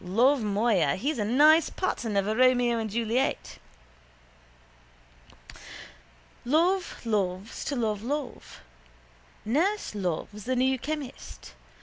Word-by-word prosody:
Love, 240 +9 +3
moya! 205 -7 +1
He's 270 +5 -2
a - - +1
nice 300 +8 +5
pattern 230 - -2
of 200 0 +1
a 215 - 0
Romeo 245 -1 +3
and 220 -1 -3
Juliet. 230 - -2 2.8
Love 340 +5 0
loves 200 -2 -2
to 285 - -2
love 215 -4 -1
love. 280 +3 -5 0.8
Nurse 340 - 0
loves 200 +2 -4
the 255 +1 -1
new 260 +1 +1
chemist. 295 0 -7
240 Hz, 105 wpm, -27 LUFS, 210-280 Hz, 2.8 s, nice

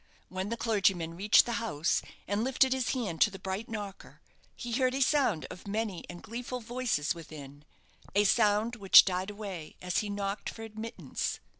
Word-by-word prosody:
When 185 +2 -4
the 235 - -2
clergyman 195 -8 +1
reached 205 +4 +5
the 240 - -3
house, 170 -8 0 0.3
and 205 +3 0
lifted 265 +1 +3
his 260 -2 -1
hand 205 -11 -3
to - - +7
the 195 - -9
bright 190 +3 -4
knocker, 205 -3 -7 0.4
he 240 - -6
heard 255 +1 +1
a 275 - -1
sound 260 - +2
of 180 +2 -10
many 205 -3 -3
and 175 0 -9
gleeful 240 +3 -5
voices 235 -10 -1
within 150 -3 -11 0.5
a 205 - +5
sound 215 +2 +2
which 195 -3 +8
died 185 +1 -1
away 200 -6 -7
as 180 -1 -1
he 210 - -3
knocked 200 0 -3
for 225 - -9
admittance. 225 +1 -5
205 Hz, 175 wpm, -30 LUFS, 185-230 Hz, 0.5 s, which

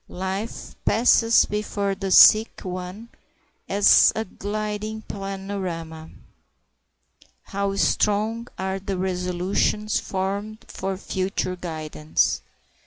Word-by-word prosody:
Life 190 +4 -5
passes 230 0 +4
before 205 -1 -2
the 195 0 -4
sick 215 +4 +7
one 185 +4 -6 0.6
as 200 0 +6
a 220 - -2
gliding 215 +2 -4
panorama. 190 -6 -6 1.3
How 200 0 -2
strong 215 +3 +1
are 190 0 -2
the 195 0 -4
resolutions 185 +3 -1
formed 200 +3 -4
for 190 0 -4
future 185 -1 -2
guidance! 155 -3 -1
195 Hz, 90 wpm, -23 LUFS, 185-210 Hz, 1.3 s, sick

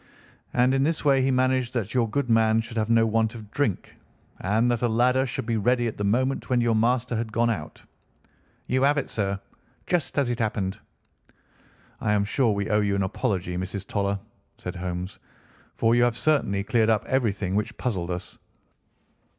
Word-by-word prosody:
"And 125 +2 +4
in 135 - +2
this 155 +2 0
way 135 -2 +4
he 130 - +2
managed 130 -1 +1
that 110 -4 -2
your 120 -3 +1
good 140 +4 -1
man 115 -1 +4
should 115 +1 -9
have 110 -1 0
no 115 -1 +4
want 110 0 +1
of 105 -3 -10
drink, 125 -10 -2 0.4
and 110 +6 +1
that 120 - -1
a 120 - +2
ladder 125 +3 +2
should 120 - -4
be 115 0 0
ready 120 +3 +2
at 115 - -2
the 105 - -3
moment 130 +6 0
when 125 -1 +3
your 120 -1 +2
master 120 +2 +1
had 110 -1 -3
gone 115 +2 +2
out." 80 -8 -6 0.8
"You 130 +1 0
have 145 +2 +3
it, 140 - -2
sir, 100 -2 -1 0.5
just 175 -5 -1
as 135 -4 +2
it 120 - -3
happened." 105 -4 -1 1.2
"I 105 - 0
am 105 -1 +2
sure 115 +3 +1
we 100 -1 -1
owe 105 0 +3
you 100 -1 +1
an 100 - +1
apology, 95 -3 -2
Mrs. 95 +1 -4
Toller," 100 -1 -1 0.4
said 90 +1 -6
Holmes, 90 0 -5 0.6
"for 115 0 +2
you 120 - +4
have 120 -1 +2
certainly 125 -10 +1
cleared 110 +1 +2
up 110 -2 +2
everything 105 -8 0
which 105 +1 -2
puzzled 95 -9 -2
us. 90 0 -6
115 Hz, 190 wpm, -25 LUFS, 100-125 Hz, 1.2 s, And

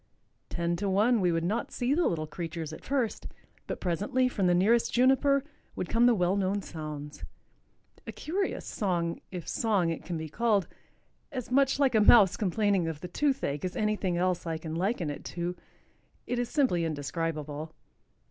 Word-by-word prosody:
Ten 170 0 -1
to 200 +1 -1
one 215 +4 +3
we 180 -1 +3
would 165 0 0
not 215 +7 -1
see 250 +3 0
the 345 +3 +2
little 155 -2 -1
creatures 160 0 -5
at - - -10
first. 255 -5 -1 0.4
But - - -4
presently, 205 +9 0
from 200 -7 0
the 175 - +4
nearest 225 +6 +3
juniper, 270 +2 +3 0.3
would 180 - -4
come 235 +1 +4
the 240 - +5
well 180 -1 +2
known 200 0 0
sounds. 150 -2 -7 0.8
A - - -3
curious 380 +5 -3
song, 175 -5 -1
if 180 -3 -7
song 200 -7 +1
it 165 - -5
can 175 -2 -4
be 160 0 -5
called—as 235 - -3
much 270 +1 +3
like 275 -3 +3
a 220 - +4
mouse 210 -3 +7
complaining 200 -2 +1
of 160 -2 -5
the 180 - -5
toothache 220 - -1
as 185 0 -3
anything 210 -4 0
else 180 -1 0
I 165 -1 -1
can 160 0 -6
liken 180 -2 -1
it 145 - -8
to—it 180 +7 -7
is 245 - -1
simply 250 - +2
indescribable. 155 0 -3
185 Hz, 170 wpm, -29 LUFS, 165-235 Hz, 0.8 s, mouse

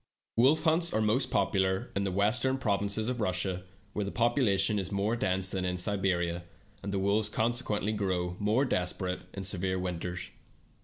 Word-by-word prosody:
Wolf 140 +7 +4
hunts 165 +1 +3
are - - +3
most 115 +5 +2
popular 95 -1 +1
in 100 - +1
the 100 -1 -1
western 120 +7 +2
provinces 100 -2 0
of 125 -2 -2
Russia, 95 -1 -1 0.3
where 105 - -1
the 100 - -3
population 110 -4 +2
is 95 0 -4
more 100 +3 0
dense 95 -3 0
than 95 -1 -1
in 90 0 -1
Siberia, 90 -3 0 0.4
and 100 - -4
the 100 - -1
wolves 100 +2 +2
consequently 110 -2 0
grow 90 -4 -1
more 110 +7 +2
desperate 90 -3 -1 0.2
in 100 - -4
severe 95 -1 -1
winters. 90 0 -4
100 Hz, 165 wpm, -30 LUFS, 95-110 Hz, 0.4 s, Wolf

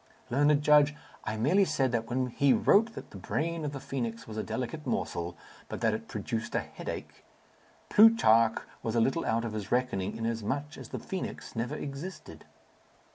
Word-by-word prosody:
"Learned 145 +3 +4
judge, 150 0 +5 0.3
I 110 - -2
merely 175 - +4
said 135 -8 +1
that 115 -1 -1
when 130 +1 +1
he 140 +2 +4
wrote 225 +3 +4
that - - -9
the - - -9
brain 165 +1 -2
of 145 - -2
the 140 - -6
phoenix 120 -4 -4
was 110 - -7
a 110 - -1
delicate 125 +8 -4
morsel, 85 0 -2 0.3
but - - -5
that - - +3
it - - -4
produced 115 0 -4
headache, - - -5 0.6
Plutarch 115 - +6 0.2
was 115 0 -2
a - - +4
little 135 +8 +2
out 115 +1 +1
of 115 - -4
his 105 -2 -5
reckoning, 120 -6 0
inasmuch 115 +7 -2
as - - -10
the - - -4
phoenix 190 -7 -6
never 120 +6 -2
existed." 145 +6 -7
130 Hz, 175 wpm, -30 LUFS, 115-150 Hz, 0.6 s, Plutarch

